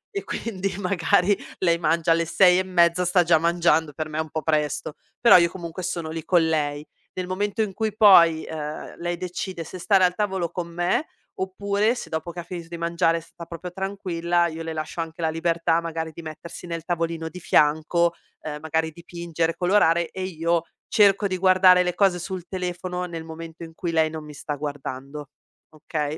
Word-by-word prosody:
e 400 - -2
quindi, 195 -4 -4
magari, 200 +1 +2 0.2
lei 170 -2 +2
mangia 165 0 +1
alle 165 0 +3
6 180 +2 +5
e - - +1
mezza 175 -1 +3
sta 180 0 +3
già 165 -2 +4
mangiando, 165 -2 +2
per 155 +1 -4
me 155 +1 -4
un 160 -1 -2
po' 155 +1 -4
presto, 150 -1 -1 0.3
però 235 -5 +8
io 170 -1 +4
comunque 175 0 -7
sono 170 -3 -3
lì 160 -1 -5
con 170 -3 +3
lei. 150 -1 -1 0.3
Nel 185 -1 -3
momento 205 +4 -1
in 195 -3 -4
cui 215 0 -2
poi, 170 -7 +7
ehm, 150 -1 -6
lei 175 0 -3
decide 180 -1 -5
se 180 +3 -9
stare 190 +1 +3
al 180 0 +4
tavolo 190 -4 -1
con 175 -2 -4
me 175 - 0 0.3
oppure 200 +4 0
se - - -7
dopo 160 +2 -3
che 175 - -8
ha - - -10
finito 170 -1 -7
di 170 - -6
mangiare 170 0 +1
sta 170 +1 -12
proprio 170 +2 -8
tranquilla, 175 -3 -1
io 165 0 -6
le 160 0 -4
lascio 155 +2 -4
anche 165 +1 -7
la 160 - +1
libertà 165 0 +1
magari 165 -1 -4
di 170 - -9
mettersi 160 +2 -9
nel 165 -1 -4
tavolino 165 -2 -2
di 180 +2 -8
fianco, 160 +3 +2 0.3
ehm, 150 -1 -5
magari 160 0 -1
dipingere, 170 0 -3
colorare 170 -3 +3
e 190 0 -5
io 170 -2 0 0.2
cerco 200 -1 +4
di 185 -2 -1
guardare 185 -1 +6
le 180 -1 -1
cose 190 -3 +3
sul 185 0 -5
telefono 180 -1 -4
nel 165 -2 -6
momento 165 +1 -9
in 165 0 -10
cui 170 +1 -4
lei 160 -1 +2
non 160 -1 -6
mi 150 - -10
sta 150 +1 -4
guardando, 145 0 -6 0.4
okay, 155 0 -4
170 Hz, 195 wpm, -24 LUFS, 160-185 Hz, 0.4 s, però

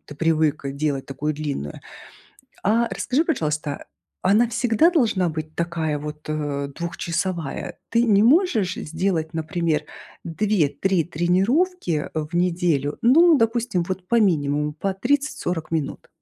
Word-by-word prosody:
ты 145 - -10
привык 155 -1 +1
делать 140 -1 -2
такую 150 +3 -3
длинную. 140 - -4 0.8
А 230 +4 +3
расскажи, 280 +6 0
пожалуйста, 150 - -2 0.4
она 210 +6 +4
всегда 240 +6 +3
должна 215 - +2
быть 155 0 -6
такая 165 -3 -1
вот, 150 +1 -8
э, 145 -2 -2
двухчасовая? 170 -1 -3
Ты 235 0 +2
не 205 -3 +4
можешь 235 - +3
сделать, 165 0 -2
например, 160 -1 -1 0.4
2-3 185 -1 +1
тренировки 185 - +1
э 155 -1 -2
в - - -10
неделю? 170 -5 +1
Ну, 315 +6 +6
допустим, 225 -5 +1
вот 185 -1 -4
по 235 - +3
минимуму, 150 -6 +1
по 195 +5 -2
30-40 215 - -1
минут? 160 -4 -3
170 Hz, 125 wpm, -23 LUFS, 155-215 Hz, 0.8 s, Ну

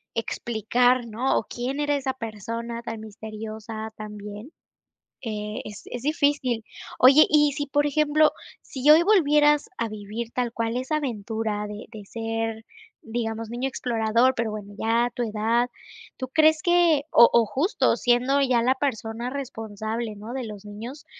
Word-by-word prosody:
explicar, 240 +2 +1
¿no?, 235 +4 0
o - - 0
¿quién 250 +5 -4
era 290 0 +1
esa 270 -1 -2
persona 230 0 -5
tan 225 -1 -6
misteriosa 220 +1 -7
también? 210 +3 -8 0.7
Eh, 215 0 -4
es 210 -1 -9
es 245 - -6
difícil. 285 -5 +1 0.3
Oye, 270 +4 +8
y 295 -1 +4
si, 290 +1 -3
por 290 +1 +1
ejemplo, 305 +1 +3 0.3
si 270 +2 +1
hoy 315 +2 +8
volvieras 300 -4 +4
a 230 - -1
vivir 215 +2 -6
tal 245 -2 -1
cual 230 0 -2
esa 260 +4 -1
aventura 220 -5 -3
de 210 +1 -7
de 215 -3 -9
ser, 225 0 -3 0.4
digamos, 225 -1 -4
niño 245 +3 -2
explorador, 235 0 +1
pero 230 -3 -1
bueno, 210 -1 -7
ya 235 +2 +1
tu 245 - -2
edad, 225 +2 +1 0.5
¿tú 260 - -5
crees 310 +3 +4
que?, 345 -4 +4
o 235 - +8
o 235 - +6
justo 270 - +1
siendo 250 +3 +2
ya 255 -4 +3
la 255 +2 +3
persona 235 -3 -3
responsable, 225 -4 -5
¿no?, 215 +3 -8
de 260 -1 -3
los 210 -2 -8
niños, 225 +8 -8
235 Hz, 155 wpm, -25 LUFS, 220-270 Hz, 0.7 s, Oye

